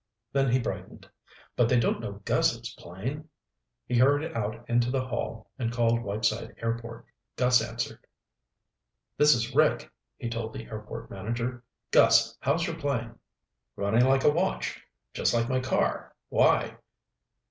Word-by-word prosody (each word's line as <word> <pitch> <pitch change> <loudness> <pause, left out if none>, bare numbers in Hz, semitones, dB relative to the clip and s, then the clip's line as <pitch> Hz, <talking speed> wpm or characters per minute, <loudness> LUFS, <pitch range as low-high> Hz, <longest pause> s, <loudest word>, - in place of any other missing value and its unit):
Then 135 -1 +2
he 125 - +4
brightened. 120 - -5 0.5
"But 120 -1 +3
they 125 - +4
don't 115 - +1
know - - -7
Gus's - - +1
plane!" 130 - -6 0.6
He 125 -1 +1
hurried 145 +4 +3
out 110 +1 -4
into 120 0 +2
the 130 0 0
hall 115 -3 -5
and 115 -2 -1
called 115 -1 +2
Whiteside 110 +1 -1
Airport. 115 0 -4 0.3
Gus 125 -1 +4
answered. - - -4 1.2
"This 150 0 +6
is 120 +2 -2
Rick," 155 +2 +2 0.3
he - - -5
told 115 -1 -4
the 115 - -7
airport 105 -1 -8
manager. 120 +5 -4 0.3
"Gus, - - +5
how's 160 +6 +1
your 165 -2 -4
plane?" 120 -6 -2 0.6
"Running 110 +5 +3
like 135 0 +3
a - - +6
watch. 180 +5 -1 0.3
Just - - +1
like 115 0 +1
my 130 +1 +1
car. 130 0 -1
Why?" - - +3
120 Hz, 145 wpm, -28 LUFS, 115-135 Hz, 1.2 s, This